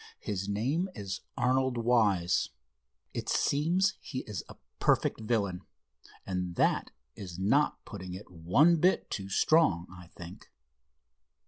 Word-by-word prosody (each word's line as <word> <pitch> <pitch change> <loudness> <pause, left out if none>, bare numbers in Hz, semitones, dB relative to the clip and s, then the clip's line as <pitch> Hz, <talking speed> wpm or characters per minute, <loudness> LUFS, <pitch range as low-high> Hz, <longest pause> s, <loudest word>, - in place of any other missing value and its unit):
His 100 -1 -3
name 135 - 0
is 100 -3 -5 0.2
Arnold 130 0 +1
Wise. 105 -7 +2 0.6
It - - -4
seems 175 +7 +2
he 130 -2 -5
is 105 -4 -5
a - - -10 0.2
perfect - - +2
villain, 105 -5 -1 0.6
and 90 -2 -3
that - - +2 0.3
is 90 -4 -8
not 120 +11 +1
putting 95 -3 -7
it 95 0 -11
one 90 - +4
bit 180 +4 +2
too 95 -1 -4
strong, 95 - +3
I 90 -1 -12
think." 85 +1 -11
105 Hz, 125 wpm, -30 LUFS, 90-130 Hz, 0.6 s, one